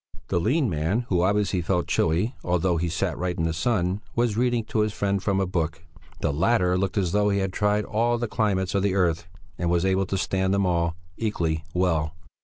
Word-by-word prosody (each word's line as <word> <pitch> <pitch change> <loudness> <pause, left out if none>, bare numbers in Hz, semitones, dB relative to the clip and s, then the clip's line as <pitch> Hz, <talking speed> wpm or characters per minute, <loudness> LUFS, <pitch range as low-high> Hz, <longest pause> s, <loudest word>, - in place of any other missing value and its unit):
The 85 - +1
lean 130 - +2
man, 85 +5 0
who 90 -3 +2
obviously 100 -1 +1
felt 90 0 0
chilly, 90 +10 +1
although 90 0 +1
he 85 +1 -1
sat 80 - -1
right 90 0 -2
in 80 - 0
the 80 0 0
sun, 95 +1 0
was 120 -3 +1
reading 120 0 +1
to 110 - -2
his 105 -1 +1
friend 100 -2 0
from 100 -1 0
a 95 - +1
book; 80 -3 -2 0.4
the - - 0
latter 90 +3 +2
looked 95 +2 -1
as 90 -4 +1
though 105 +1 +2
he 100 - +1
had 95 -1 -1
tried 105 +1 +1
all 120 +2 +1
the 120 0 -2
climates 100 -4 0
of 100 - +2
the 100 -1 +1
earth 85 -3 +1 0.3
and 85 - 0
was 85 +1 +2
able 95 0 +1
to 95 - -1
stand 95 +1 0
them 100 -1 +2
all 85 -2 +1 0.2
equally 85 -8 -1
well. 80 -4 +1
95 Hz, 215 wpm, -25 LUFS, 85-105 Hz, 0.4 s, lean